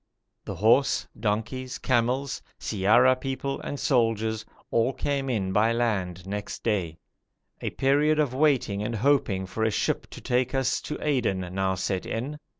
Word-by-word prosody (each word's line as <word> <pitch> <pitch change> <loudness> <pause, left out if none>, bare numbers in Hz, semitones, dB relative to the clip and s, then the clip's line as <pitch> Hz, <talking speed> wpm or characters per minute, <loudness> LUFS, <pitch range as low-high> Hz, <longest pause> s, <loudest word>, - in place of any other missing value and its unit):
The - - -5
horse, 120 +7 +3
donkeys, 125 +4 -2
camels, 130 +2 0 0.2
siyara 115 +6 +4
people, 135 +1 -4
and 145 - -5
soldiers 110 -4 +1 0.3
all 115 +3 +2
came 140 -1 -2
in 100 -6 -1
by 110 +3 +3
land 95 -7 -1
next 100 +1 -5
day. 90 -8 -1 0.6
A - - -1
period 145 +3 +2
of 145 -5 +1
waiting 130 -8 +2
and 110 +2 -2
hoping 110 -6 +2
for 110 +4 -3
a 110 - +3
ship 105 - -1
to - - -10
take 125 +1 0
us 130 -1 +1
to 150 - -4
Aden 120 -10 +1
now 95 0 0
set 95 0 -2
in. 140 +7 -4
115 Hz, 150 wpm, -26 LUFS, 105-135 Hz, 0.6 s, siyara